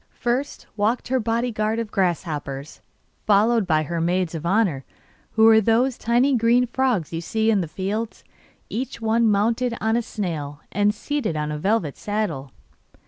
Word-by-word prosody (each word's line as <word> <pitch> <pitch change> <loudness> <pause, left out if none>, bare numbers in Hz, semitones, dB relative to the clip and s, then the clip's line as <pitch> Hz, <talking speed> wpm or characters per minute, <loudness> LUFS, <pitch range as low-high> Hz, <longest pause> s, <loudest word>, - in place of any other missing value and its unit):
First 245 +4 -2
walked 220 +4 0
her 260 0 +2
bodyguard 225 -1 -1
of 230 -2 -3
grasshoppers, 155 -6 -2 0.5
followed 215 0 +3
by 155 -3 +2
her 165 +2 -3
maids 175 0 0
of 165 0 -4
honour, 185 -9 +1 0.5
who 220 - +3
were 220 0 +7
those 235 +4 +2
tiny 245 +4 +2
green 240 +1 +3
frogs 245 - 0
you 165 - -2
see 220 +5 +1
in 205 -3 +2
the 170 - -3
fields, 205 +7 -4 0.4
each 255 +3 -4
one 225 0 +2
mounted 230 +4 +1
on 220 +1 +1
a 240 - +2
snail, 155 -10 -5
and 205 +1 +2
seated 260 - -2
on 150 0 -2
a 150 - -4
velvet 190 -5 0
saddle. 205 -11 -3
215 Hz, 160 wpm, -23 LUFS, 170-230 Hz, 0.5 s, were